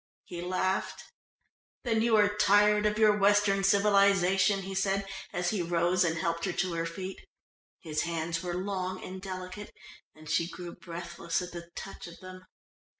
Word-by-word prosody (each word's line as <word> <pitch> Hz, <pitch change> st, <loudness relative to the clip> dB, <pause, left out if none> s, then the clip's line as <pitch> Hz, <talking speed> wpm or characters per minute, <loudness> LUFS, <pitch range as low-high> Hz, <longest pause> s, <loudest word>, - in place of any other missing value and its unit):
He 175 Hz, -1 st, -7 dB
laughed. 185 Hz, +1 st, -1 dB, 0.8 s
"Then 225 Hz, -3 st, +1 dB
you 230 Hz, -1 st, +3 dB
are 205 Hz, -1 st, +4 dB
tired 210 Hz, +1 st, +4 dB
of 210 Hz, 0 st, -1 dB
your 215 Hz, -1 st, +5 dB
Western 205 Hz, -1 st, +3 dB
civilisation," 195 Hz, -1 st, +4 dB
he 195 Hz, +1 st, -6 dB
said 195 Hz, +1 st, 0 dB, 0.3 s
as 175 Hz, 0 st, -1 dB
he 210 Hz, -4 st, -1 dB
rose 175 Hz, +1 st, +2 dB
and 165 Hz, -2 st, 0 dB
helped 170 Hz, +1 st, -1 dB
her 190 Hz, -, -1 dB
to 185 Hz, -1 st, -1 dB
her 165 Hz, 0 st, -1 dB
feet 185 Hz, +3 st, -6 dB, 0.6 s
(his 155 Hz, -3 st, -2 dB
hands 165 Hz, 0 st, -2 dB
were 175 Hz, -1 st, -3 dB
long 185 Hz, 0 st, -3 dB
and 185 Hz, 0 st, -7 dB
delicate, 185 Hz, +1 st, -7 dB, 0.4 s
and 155 Hz, 0 st, -14 dB
she 170 Hz, +3 st, +1 dB
grew 175 Hz, -1 st, -8 dB
breathless 170 Hz, -1 st, -4 dB
at 180 Hz, -, -8 dB
the 170 Hz, -1 st, -9 dB
touch 195 Hz, -2 st, -8 dB
of 170 Hz, -, -12 dB
them). 185 Hz, 0 st, -11 dB
185 Hz, 165 wpm, -29 LUFS, 175-200 Hz, 0.8 s, your